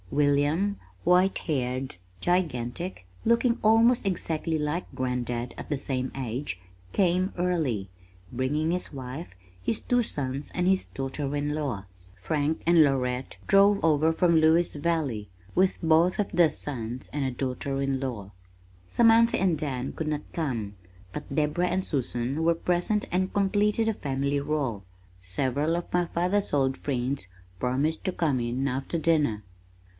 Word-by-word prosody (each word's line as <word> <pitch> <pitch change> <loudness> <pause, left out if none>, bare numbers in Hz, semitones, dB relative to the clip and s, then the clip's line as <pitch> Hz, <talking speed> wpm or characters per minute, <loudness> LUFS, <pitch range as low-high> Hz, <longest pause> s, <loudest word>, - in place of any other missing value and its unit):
William, 145 - +2 0.3
white 180 +2 +4
haired, 130 - -2 0.2
gigantic, 170 - -1 0.2
looking 235 +1 +3
almost 225 +2 +5
exactly 165 -3 -1
like 150 +4 -3
Grandad 125 -1 -2
at - - -8
the 145 - 0
same 130 -1 -2
age, 125 -5 -3 0.3
came 185 +1 +2
early, 160 - 0 0.5
bringing 145 +6 0
his 180 +1 -2
wife, 135 - -7 0.3
his 115 +3 0
two 245 0 +2
sons, 140 - -3
and 180 0 0
his 190 0 +3
daughter 135 +1 -4
in 145 0 -1
law. 135 -10 -3 0.3
Frank 145 - -1
and 170 -1 +6
Lorette 130 -2 -1
drove 200 +1 +5
over 155 0 +4
from 170 +1 +3
Lewis 160 +2 +4
Valley, 145 -9 -1 0.3
with 185 +1 +3
both 165 +3 +4
of 205 - 0
their 170 -2 +5
sons 125 -4 -4
and 145 -1 -1
a 130 - 0
daughter 135 +2 -3
in 135 -1 0
law. 115 -7 -5 0.6
Samantha 230 - +5
and 180 -4 +2
Dan 135 -4 -3
could 160 - -4
not 150 -1 -1
come, 115 -11 -2 0.4
but - - -6
Deborah 155 +4 +1
and 185 +1 -1
Susan 130 +1 -1
were 170 0 +3
present 180 +5 0
and 185 +2 0
completed 205 +2 +2
the 225 - +2
family 140 -3 -1
roll. 135 -9 -2 0.4
Several 135 - 0
of 175 - -6
my 175 0 +3
father's 180 +4 0
old 135 -2 +2
friends 130 -4 -2 0.3
promised 135 +6 0
to 185 - +1
come 155 -7 0
in 120 +3 -1
after 135 +5 -2
dinner. 150 -10 +1
150 Hz, 145 wpm, -27 LUFS, 130-175 Hz, 0.6 s, and